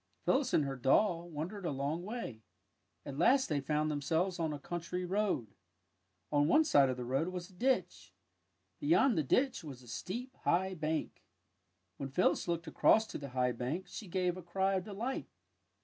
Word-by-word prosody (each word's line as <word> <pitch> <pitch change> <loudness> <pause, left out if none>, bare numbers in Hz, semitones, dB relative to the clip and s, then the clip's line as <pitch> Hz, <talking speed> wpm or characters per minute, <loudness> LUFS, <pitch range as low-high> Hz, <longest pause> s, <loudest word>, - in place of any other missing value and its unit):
Phyllis 265 -2 +2
and 150 - +3
her 135 -1 -3
doll 170 - +2
wandered 170 +6 -5
a 170 - -1
long 140 +4 -2
way. 205 - -5 0.6
At 140 0 -6
last 260 +10 +4
they 145 -3 0
found 150 +2 0
themselves 165 +5 0
on 160 -2 0
a 150 - -3
country 175 +4 -4
road. 185 - -1 0.8
On 145 0 +3
one 310 - +5
side 140 - +5
of 130 - -2
the 125 - -4
road 135 +6 0
was 180 0 -5
a - - -19
ditch. 255 +8 0 0.7
Beyond 290 -4 +4
the 160 - +2
ditch 250 - +1
was 135 -5 -9
a - - -16
steep, 240 - -5
high 190 +2 +1
bank. 155 -2 -3 0.8
When 135 - -4
Phyllis 180 +7 +2
looked 170 -1 -1
across 215 +7 +4
to - - -5
the 140 -1 -7
high 125 0 +3
bank 130 +10 -3
she 205 +3 -8
gave 180 0 0
a - - -6
cry 190 +3 0
of 185 -1 -1
delight. 220 +6 -4
170 Hz, 180 wpm, -33 LUFS, 145-195 Hz, 0.8 s, one